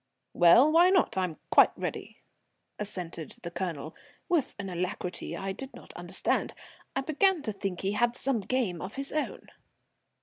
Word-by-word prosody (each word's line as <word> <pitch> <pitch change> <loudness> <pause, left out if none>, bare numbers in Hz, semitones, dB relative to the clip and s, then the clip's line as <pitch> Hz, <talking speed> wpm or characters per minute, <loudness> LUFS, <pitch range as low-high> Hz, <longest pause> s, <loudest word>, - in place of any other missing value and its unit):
"Well, 205 - +7
why 340 +3 +6
not? 375 -1 +3
I'm 185 -4 -1
quite - - +6
ready," - - -5 0.6
assented 180 -6 -5
the 170 - -5
Colonel, 170 -4 -4 0.3
with 340 -7 +1
an 200 -1 -5
alacrity 180 0 -4
I 195 0 -3
did 270 +7 -7
not - - -13
understand. - - -1 0.4
I 270 - +1
began 320 +4 +2
to 215 - -2
think 195 -3 -4
he 195 - 0
had 235 +3 +1
some 265 -2 0
game 205 -5 -1
of 190 - -6
his 275 0 -2
own. 305 - -3
200 Hz, 160 wpm, -29 LUFS, 180-275 Hz, 0.6 s, Well